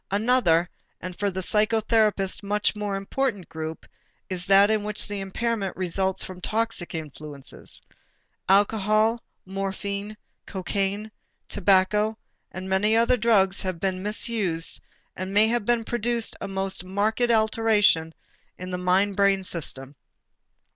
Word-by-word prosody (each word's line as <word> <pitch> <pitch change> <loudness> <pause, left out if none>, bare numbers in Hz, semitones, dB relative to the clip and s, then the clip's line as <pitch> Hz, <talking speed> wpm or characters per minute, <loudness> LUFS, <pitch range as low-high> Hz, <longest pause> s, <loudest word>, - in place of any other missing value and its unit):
Another 200 -5 +3 0.3
and 180 0 -7
for 205 +2 0
the 190 0 -4
psychotherapist 215 -1 +1
much 210 +1 0
more 205 -1 -2
important 200 -1 -2
group 160 0 -6 0.5
is 180 0 -4
that 200 +2 +6
in 215 -1 +1
which 210 0 -1
the 205 -1 -3
impairment 200 0 -2
results 190 +1 -1
from 185 -1 -9
toxic 225 -4 -2
influences. 150 -2 -5 0.7
Alcohol, 215 +3 +3 0.2
morphine, 200 +2 -4 0.3
cocaine, 200 +2 -2 0.4
tobacco, 205 +3 +3 0.3
and 185 +1 -6
many 200 +3 +2
other 235 +2 +4
drugs 210 -5 +2
may - - -4
have 185 -3 -3
been 185 0 -1
misused 205 -5 -1 0.3
and 185 +1 -5
may 210 +1 +7
have 235 -3 -1 0.2
produced 235 0 -1
a - - -3
most 195 -1 -3
marked 210 +6 0
alteration 220 -7 +3 0.5
in 185 0 -7
the 180 - -3
mind 190 +2 +2
brain 200 -1 +3
system. 145 -6 -4
200 Hz, 125 wpm, -25 LUFS, 185-215 Hz, 0.7 s, may